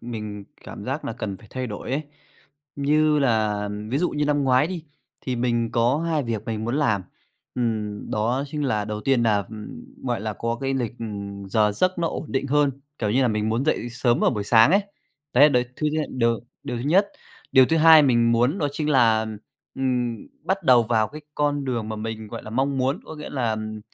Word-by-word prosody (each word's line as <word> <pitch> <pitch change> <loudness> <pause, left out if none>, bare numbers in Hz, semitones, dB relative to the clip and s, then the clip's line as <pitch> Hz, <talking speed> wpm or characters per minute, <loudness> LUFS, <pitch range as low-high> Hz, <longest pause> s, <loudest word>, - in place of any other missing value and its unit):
mình 105 -4 -6 0.2
cảm - - -8
giác - - -3
nà - - -3
cần 100 -3 -5
phải 110 - -17
thay 130 0 -3
đổi 105 +2 -6
ấy. 140 +3 0 0.7
Như 150 +2 +3
là 110 -6 +1 0.2
ví 135 - +1
dụ 180 - +1
như 150 0 -1
lăm 145 -1 +1
ngoái 130 +2 +4
đi, 175 -2 -6 0.4
thì 130 -1 -3
mình 120 -1 0
có 120 +4 +2
2 160 -2 0
việc 115 -3 -3
mình 110 -1 -3
muốn 120 +5 -1
làm, 110 -10 +1 0.5
ừm, 110 -4 -2
đó 120 +6 0
chính 150 +1 -3
là 110 -6 0
đầu 105 0 -4
tiên 130 +1 +2
nà, 110 -3 +3
ừm, 110 -1 -9 0.2
gọi 120 -5 -1
là, 110 +1 -3
có 115 +3 -3
cái 135 0 -1
lịch, 120 -4 -2
ừm, 100 -3 -6
giờ 105 +1 +2
giấc 185 - 0
nó 170 -1 +1
ổn - - -5
định 135 +1 0
hơn, 145 +1 +3 0.3
kiểu 105 -3 -1
như 130 +4 +3
là, 125 - +3
mình 105 -1 0
muốn 115 +4 0
dậy 150 -5 0
sớm 120 0 +1
vào - - +4
buổi 105 -4 -3
sáng 115 +4 +6
ấy, 200 +3 +4 0.5
đấy 145 +4 +7
đấy 125 -3 +2
thứ 155 - -1
nhất, 155 -1 0
điều 115 -2 +1 0.2
điều 125 - -4
thứ 120 - -4
nhất. 185 +8 +4 0.5
Điều 130 -1 +7
thứ 165 - +1
hai 160 -1 +8
mình 120 -4 +3
muốn 125 +9 +2
đó 145 - 0
chính 150 +1 -2
là, 115 -5 +4 0.5
ừm, 125 -3 0 0.3
bắt 190 +3 -1
đầu 125 -2 +6
vào 110 -2 +1
cái 150 - -9
con 145 -1 0
đường 120 -5 -2
mà 110 - -4
mình, 110 0 -5
gọi - - -7
là, 110 - -9
mong 135 +4 0
muốn, 130 +2 0
có - - -9
nghĩa 150 -1 -8
là, 125 -5 -1
ừm, 110 0 -5
120 Hz, 225 wpm, -24 LUFS, 110-145 Hz, 0.7 s, hai